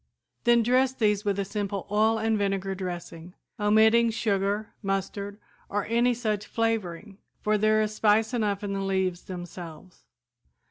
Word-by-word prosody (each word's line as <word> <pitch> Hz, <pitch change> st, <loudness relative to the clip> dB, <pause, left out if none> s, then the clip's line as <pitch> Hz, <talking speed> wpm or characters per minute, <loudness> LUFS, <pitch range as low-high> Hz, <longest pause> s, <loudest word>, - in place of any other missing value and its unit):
Then 240 Hz, -1 st, +5 dB
dress 255 Hz, +2 st, +3 dB
these 210 Hz, -5 st, +1 dB
with 200 Hz, -2 st, 0 dB
a 200 Hz, -, -1 dB
simple 200 Hz, -1 st, -3 dB
oil 220 Hz, +2 st, +3 dB
and 220 Hz, 0 st, +1 dB
vinegar 195 Hz, -2 st, -1 dB
dressing, 175 Hz, -2 st, -7 dB, 0.2 s
omitting 220 Hz, +3 st, +5 dB
sugar, 205 Hz, -1 st, -1 dB
mustard 200 Hz, 0 st, -3 dB, 0.3 s
or 205 Hz, 0 st, -1 dB
any 240 Hz, +2 st, +2 dB
such 215 Hz, -3 st, -2 dB
flavoring, 210 Hz, -3 st, -2 dB, 0.2 s
for 215 Hz, 0 st, +2 dB
there 215 Hz, +1 st, +3 dB
is 215 Hz, 0 st, -3 dB
spice 215 Hz, +2 st, +2 dB
enough 210 Hz, -4 st, 0 dB
in 200 Hz, -1 st, -2 dB
the 195 Hz, -, -2 dB
leaves 190 Hz, -2 st, -1 dB
themselves. 175 Hz, -1 st, -9 dB
205 Hz, 145 wpm, -27 LUFS, 195-220 Hz, 0.3 s, Then